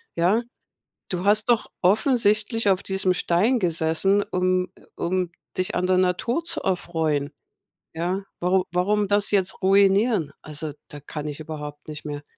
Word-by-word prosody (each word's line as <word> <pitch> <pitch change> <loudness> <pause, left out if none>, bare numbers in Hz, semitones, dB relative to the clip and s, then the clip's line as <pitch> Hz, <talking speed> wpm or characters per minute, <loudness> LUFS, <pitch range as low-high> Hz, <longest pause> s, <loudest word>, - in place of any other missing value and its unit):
ja? 185 +7 +2 0.7
Du 180 0 -2
hast 210 +1 +4
doch 235 -2 +2
offensichtlich 215 +1 +2
auf 190 - +1
diesem 190 -1 +2
Stein 210 +9 +1
gesessen, 175 +4 +1
um, 185 0 +1
äh - - -20
um 180 0 -1 0.3
dich 185 0 0
an 180 0 0
der 185 0 +2
Natur 185 - 0
zu 335 - +1
erfreuen, 160 -6 -1 0.6
ja? 180 +4 -2 0.2
Waru 180 +1 +2
warum 205 +3 +1
das 205 0 +3
jetzt 190 -2 +1
ruinieren?" 195 - +3
Also, 150 0 -4 0.2
da 145 - -9
kann 150 +1 -7
ich 150 +1 -7
überhaupt 150 -1 -8
nicht 150 0 -8
mehr. 145 -1 -6
185 Hz, 150 wpm, -23 LUFS, 160-205 Hz, 0.7 s, hast